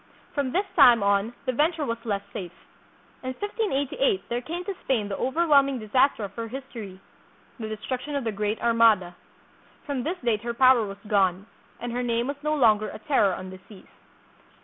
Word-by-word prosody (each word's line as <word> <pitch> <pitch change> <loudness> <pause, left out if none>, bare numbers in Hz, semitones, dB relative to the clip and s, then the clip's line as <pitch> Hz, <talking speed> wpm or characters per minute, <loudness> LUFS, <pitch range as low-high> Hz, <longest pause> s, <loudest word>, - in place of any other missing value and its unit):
From 280 -3 -1
this 385 +7 +1
time 245 - +7
on 200 +2 +2
the - - +1
venture 310 +3 +1
was 230 -2 -4
less 200 -3 -1
safe. 180 -3 -8 0.6
In 255 0 -4
1588 410 - 0
there 240 +1 -1
came 340 +7 -5
to 400 - -3
Spain 230 -6 0
the 200 - -3
overwhelming 275 -1 +3
disaster 230 +2 +2
of 200 - -6
her 230 -1 -5
history, 225 -6 -8 0.6
the 220 -1 -5
destruction 255 +6 -4
of 280 - -1
the 225 - -1
Great 210 +1 -2
Armada. 225 -6 +4 0.7
From 280 -4 -2
this 335 +8 -3
date 225 -3 +1
her 235 +1 -4
power 255 -3 +5
was 195 0 -8
gone, 195 -2 +2 0.3
and 240 +1 -4
her 245 +1 -2
name 235 -1 0
was 280 +2 -4
no 305 0 +1
longer 215 -6 +3
a - - -8
terror 215 -7 +2
on 185 0 -8
the 190 - -10
seas. 205 -4 -14
235 Hz, 185 wpm, -26 LUFS, 210-280 Hz, 0.7 s, time